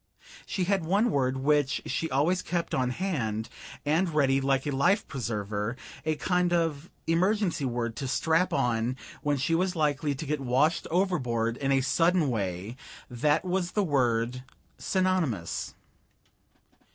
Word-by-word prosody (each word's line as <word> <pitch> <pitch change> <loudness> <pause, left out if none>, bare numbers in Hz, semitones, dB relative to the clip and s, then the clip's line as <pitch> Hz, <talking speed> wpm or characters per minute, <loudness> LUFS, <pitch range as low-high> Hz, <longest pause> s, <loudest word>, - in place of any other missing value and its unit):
She 190 - -1
had 190 -1 +1
one 200 +8 +2
word 130 -1 +1
which 145 +1 +2
she 165 - -2
always 160 +8 +2
kept 170 -2 -2
on 130 -1 +1
hand, 125 - -2 0.4
and 165 +5 +2
ready, 135 -3 +3
like 135 0 +1
a 145 - -1
life 140 +10 +2
preserver, 105 -3 -3 0.3
a 155 -1 0
kind 180 +2 +1
of 165 -2 0 0.2
emergency 180 -1 +1
word 120 -2 -2
to 135 - -3
strap 160 +6 +2
on 125 -2 0 0.3
when 145 -1 +1
she 140 +5 0
was 180 +2 +1
likely 150 -2 0
to 145 - -6
get 150 0 -1
washed 135 +6 +2
overboard 125 - 0
in 140 -1 -1
a 135 -1 +4
sudden 165 +3 +2
way 100 +1 -3 0.3
that 150 +7 +1
was 180 -1 -1
the 210 - +2
word 125 -5 +1 0.4
Synonymous. 180 - -1
145 Hz, 145 wpm, -28 LUFS, 125-175 Hz, 0.4 s, a